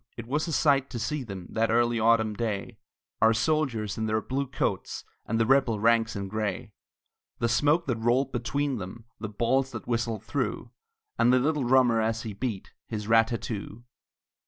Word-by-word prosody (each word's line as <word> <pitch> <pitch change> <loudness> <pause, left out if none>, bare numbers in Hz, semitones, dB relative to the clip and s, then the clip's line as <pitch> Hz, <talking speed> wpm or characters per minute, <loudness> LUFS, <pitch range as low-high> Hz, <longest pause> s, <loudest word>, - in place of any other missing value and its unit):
It 120 - -6
was 150 +7 -1
a - - -3
sight 140 -3 +3
to 120 - -5
see 120 +6 -2
them, 95 -7 -7
That 115 0 +1
early 120 0 +2
autumn 110 -1 +3
day, 105 -2 -3 0.4
Our 110 0 +5
soldiers 120 -9 0
in 110 - -1
their 110 0 +1
blue 135 +5 -2
coats, 130 - -2 0.2
And 115 +1 0
the 115 - +3
rebel 125 -4 +3
ranks 115 +1 +3
in 100 -1 -3
gray; 105 +1 -3 0.7
The 115 - 0
smoke 150 +7 +2
that 125 -4 -1
rolled 120 +4 +1
between 135 +2 -1
them, 100 +5 -8
The 110 0 -4
balls 125 +5 +1
that - - -7
whistled 115 -2 -1
through, - - -3 0.5
And 120 - +5
the 130 - +5
little 145 +1 +1
drummer 125 -3 +4
as 115 +1 -1
he 110 -3 -5
beat 105 -2 -4 0.2
His 105 -2 -5
rat 115 0 +5
tat 115 -3 -4
too! 110 +1 -6
115 Hz, 185 wpm, -27 LUFS, 110-130 Hz, 0.7 s, Our